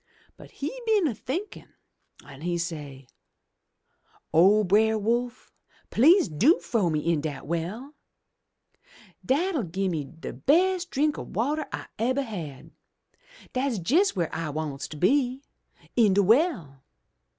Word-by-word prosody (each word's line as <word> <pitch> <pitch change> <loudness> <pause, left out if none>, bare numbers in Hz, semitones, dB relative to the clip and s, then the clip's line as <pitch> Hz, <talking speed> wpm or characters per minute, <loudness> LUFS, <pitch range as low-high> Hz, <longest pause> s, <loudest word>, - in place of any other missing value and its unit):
But - - -14
he 480 - -6
been 425 -5 +3
a 280 - 0
thinkin' 320 - -6 0.5
an' 140 -1 -13
he 175 +1 -1
say, 150 -5 -6 1.3
'O 195 +6 +5
Brer 220 +3 +3
Wolf, 240 +3 -2 0.4
please 335 - +5
do 205 - +3
frow 210 -7 0
me 155 -1 0
into 155 0 -1
de 140 -2 -9
well! 180 - -4 1.3
Dat'll 320 +3 +1
gi'e 190 +1 -2
me 155 -5 -3
de 160 +4 -9
bes' 360 +5 +2
drink 300 -2 0
ob - - -9
water 290 +7 -1
Fse - - -6
ebber 260 +5 +1
had. 165 - -8 0.8
Dat's 255 -2 -1
jes' 385 +7 +4
w'ere 170 -4 -2
I 165 -2 -3
wants 145 -2 -4
to 155 - -9
be 255 - +1 0.2
— - - -29
in 215 -5 +4
de 200 - +4
well. 195 - +1
220 Hz, 140 wpm, -26 LUFS, -, 1.3 s, O